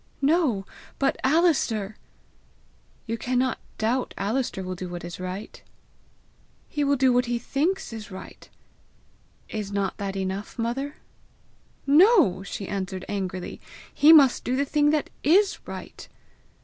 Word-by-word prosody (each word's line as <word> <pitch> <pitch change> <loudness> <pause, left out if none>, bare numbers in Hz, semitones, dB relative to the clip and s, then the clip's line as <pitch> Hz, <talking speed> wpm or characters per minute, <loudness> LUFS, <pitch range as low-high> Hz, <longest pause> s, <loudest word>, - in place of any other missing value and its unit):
"No; 275 - +2 0.3
but 275 0 +1
Alister!" 265 - +2 1.1
"You 230 0 -3
cannot 255 0 0 0.2
doubt 240 +4 -1
Alister 210 -1 -1
will 185 0 -4
do 180 0 -6
what 175 0 -6
is 175 +1 -8
right!" 185 +3 -6 1.1
"He 295 - -2
will 285 0 +3
do 260 -1 +3
what 245 0 +2
he 240 0 0
thinks 300 +7 -1 0.2
right!" 185 -1 -11 1.0
"Is 210 -2 -5
not 200 -1 -1
that 195 -1 -4
enough, 195 +3 -4
mother?" 260 +5 -2 0.9
"No," 305 - +5
she 195 0 -6
answered 190 -2 -4
angrily; 185 -3 -4 0.3
"he 295 +2 +6
must 280 -6 +6
do 250 - -1
the 280 +2 +1
thing 295 +1 +2
that 305 -1 0
is 390 +7 +4
right." - - -8
240 Hz, 130 wpm, -25 LUFS, 195-285 Hz, 1.1 s, he